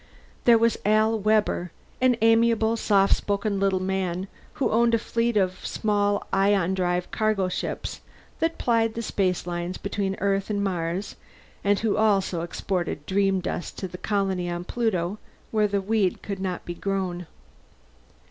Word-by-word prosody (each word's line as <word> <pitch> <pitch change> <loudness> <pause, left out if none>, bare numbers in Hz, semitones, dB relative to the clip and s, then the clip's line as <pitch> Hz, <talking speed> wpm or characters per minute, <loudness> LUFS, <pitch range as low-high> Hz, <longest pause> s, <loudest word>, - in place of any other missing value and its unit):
There 235 -1 +7
was 230 0 +2
Al 215 +2 +3
Webber, 210 -4 +1 0.3
an 255 -2 +4
amiable, 225 0 +4
soft 200 -3 +3
spoken 200 0 -1
little 195 -1 +2
man 185 -1 -2 0.3
who 275 - 0
owned 235 +1 +4
a - - +3
fleet 230 0 0
of 185 -2 0
small 205 -1 0
ion 195 -2 +3
drive 180 -1 -1
cargo 215 -4 +1
ships - - -4 0.4
that 330 0 0
plied 225 -2 +1
the 230 - -3
spacelines 180 -3 -1
between 200 -1 -2
Earth 195 0 0
and 205 -1 0
Mars, 180 0 -2 0.5
and 205 0 +3
who 215 -2 +1
also 195 -5 +2
exported 175 -2 -3
dreamdust 190 -2 0
to 190 - -4
the 180 0 -9
colony 195 -4 -1
on 175 0 -3
Pluto, 205 -3 -1 0.3
where 215 -1 +3
the 200 -1 0
weed 200 -2 0
could 200 -2 -4
not 185 -2 -3
be 175 - -4
grown. 180 -2 -3
200 Hz, 150 wpm, -25 LUFS, 185-215 Hz, 0.5 s, There